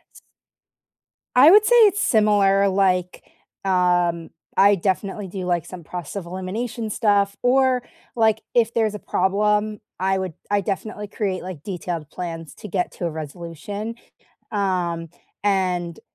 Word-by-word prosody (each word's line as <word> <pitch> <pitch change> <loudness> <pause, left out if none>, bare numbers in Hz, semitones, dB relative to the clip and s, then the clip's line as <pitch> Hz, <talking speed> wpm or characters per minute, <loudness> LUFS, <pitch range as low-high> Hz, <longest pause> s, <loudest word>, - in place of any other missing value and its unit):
S - - -13 1.2
I 270 +5 +8
would 420 +3 +7
say 485 - +4
it's 410 +1 0
similar, 205 - +4
like, 185 -2 +1 0.4
um, 175 -3 +1 0.3
I 200 +1 +6
definitely 195 +2 -2
do 185 0 -5
like 175 -2 0
some 180 -1 -9
process 175 +1 -7
of 190 - -5
elimination 210 +6 -4
stuff 200 -2 +2
or, 255 0 +3 0.3
like, 220 -2 +3
if 230 -1 +2
there's 220 -2 +1
a - - -6
problem, 210 +3 +1 0.2
I 190 +1 +1
would 185 -3 -3 0.2
I 205 0 +2
definitely 205 +2 -4
create, 195 -3 -2
like, 180 -5 -8
detailed 175 -5 -5
plans 165 -3 -6
to - - -9
get 185 -2 -1
to 175 - -5
a - - 0
resolution. 170 +8 -6 0.6
Um, 175 -5 -1 0.3
and, 180 -4 0
195 Hz, 140 wpm, -22 LUFS, 180-210 Hz, 1.2 s, I